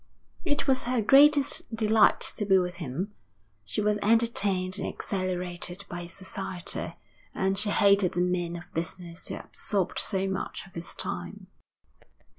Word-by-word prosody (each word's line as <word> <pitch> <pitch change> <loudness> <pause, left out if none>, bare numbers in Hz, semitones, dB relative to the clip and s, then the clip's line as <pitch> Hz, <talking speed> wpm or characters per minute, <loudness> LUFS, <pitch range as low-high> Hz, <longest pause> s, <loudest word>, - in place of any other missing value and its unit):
It 290 -4 -1
was 260 -2 +2
her 250 0 0
greatest 275 +1 +5
delight 220 0 +4 0.2
to - - -1
be 195 -2 +4
with 180 -1 -1
him. 175 +6 -4 0.5
She 105 - -2
was 210 0 +1
entertained 205 -4 +2
and - - -2
exhilarated 180 -1 -3
by 175 0 -5
his 170 0 -8
society, 190 -3 -4 0.4
and 190 0 +1
she 210 - +3
hated 200 -2 +4
the 175 - 0
men 175 -1 -1
of 175 - -10
business 170 +1 -5
who - - -4
absorbed 195 -4 -3
so 195 -2 +2
much 190 - -4
of 195 - -18
his 170 +1 -5
time. - - -5
190 Hz, 150 wpm, -27 LUFS, 175-210 Hz, 0.5 s, greatest